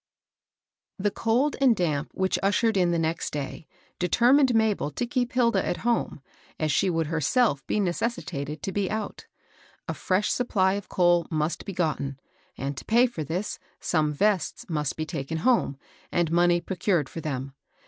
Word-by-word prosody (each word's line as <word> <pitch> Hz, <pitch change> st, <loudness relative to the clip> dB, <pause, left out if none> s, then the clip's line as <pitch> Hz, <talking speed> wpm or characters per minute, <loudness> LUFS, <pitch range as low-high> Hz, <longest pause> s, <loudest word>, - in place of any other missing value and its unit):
|HE 205 Hz, -, +2 dB
cold 245 Hz, +8 st, +1 dB
and 255 Hz, -4 st, +5 dB
damp 155 Hz, -5 st, -1 dB
which 190 Hz, 0 st, +1 dB
ushered 215 Hz, +3 st, +2 dB
in 180 Hz, -2 st, +3 dB
the 170 Hz, -, +1 dB
next 165 Hz, 0 st, -1 dB
day 145 Hz, +2 st, -5 dB, 0.3 s
determined 245 Hz, -, +4 dB
Mabel 220 Hz, -8 st, +2 dB
to 195 Hz, -, -3 dB
keep 245 Hz, 0 st, -1 dB
Hilda 240 Hz, -2 st, +3 dB
at -, -, -1 dB
home, 235 Hz, -, 0 dB, 0.4 s
as 155 Hz, -1 st, +1 dB
she 190 Hz, -, +2 dB
would 165 Hz, -2 st, 0 dB
herself 160 Hz, -, +1 dB
be -, -, 0 dB
neces 205 Hz, +5 st, 0 dB
sitated 150 Hz, -1 st, -6 dB
to 195 Hz, -, -2 dB
be 195 Hz, -1 st, -1 dB
out. 215 Hz, -1 st, -4 dB, 0.6 s
A -, -, -1 dB
fresh 190 Hz, +3 st, 0 dB
supply 195 Hz, -6 st, +2 dB
of 200 Hz, 0 st, -5 dB
coal 175 Hz, -2 st, +3 dB
must 155 Hz, -1 st, -1 dB
be 195 Hz, -, -5 dB
gotten; 150 Hz, -6 st, -2 dB, 0.4 s
and 140 Hz, +1 st, -3 dB
to -, -, -8 dB
pay 235 Hz, +3 st, +5 dB
for 230 Hz, -11 st, -4 dB
this, 175 Hz, +8 st, -3 dB, 0.2 s
some 155 Hz, -3 st, +1 dB
vests 200 Hz, +5 st, 0 dB
must 150 Hz, -4 st, -1 dB
be 155 Hz, -, -3 dB
taken 155 Hz, -1 st, -4 dB
home, 225 Hz, -, +2 dB, 0.3 s
and 170 Hz, -2 st, +1 dB
money 175 Hz, 0 st, +3 dB
procured 180 Hz, -4 st, 0 dB
for 165 Hz, -, -7 dB
them. 135 Hz, -3 st, -4 dB
175 Hz, 170 wpm, -26 LUFS, 155-220 Hz, 0.6 s, and